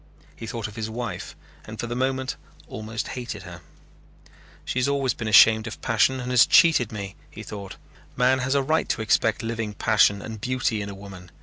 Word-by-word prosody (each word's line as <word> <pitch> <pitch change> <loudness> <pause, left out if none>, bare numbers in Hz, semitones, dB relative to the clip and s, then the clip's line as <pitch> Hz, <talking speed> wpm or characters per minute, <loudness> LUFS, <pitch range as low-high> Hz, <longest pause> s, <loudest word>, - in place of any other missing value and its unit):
He 115 - -8
thought 115 -2 -4
of 105 - -12
his 110 -1 -4
wife 115 -5 -5 0.3
and 110 0 -9
for - - -2
the 120 0 -4
moment 130 +1 -1 0.3
almost 110 +2 -5
hated 125 -2 -6
her. - - -10 1.0
"She 130 - -2
has 125 - +1
always 140 -2 +1
been 115 - -5
ashamed 110 +1 +6
of 110 - -7
passion 115 +4 +2
and 125 0 -4
has 125 -2 +6
cheated 155 - +5
me," 100 -2 -6
he - - -10
thought. 100 -2 -8 0.4
"Man 130 +1 +3
has 130 +2 0
a 140 - +2
right 155 +4 0
to 110 - -1
expect 110 - +1
living 115 -2 -3
passion 100 -2 +3
and 110 -2 -8
beauty 125 -3 -1
in 100 - -5
a 100 - -7
woman. 95 -3 -11
115 Hz, 200 wpm, -24 LUFS, 105-130 Hz, 1.0 s, ashamed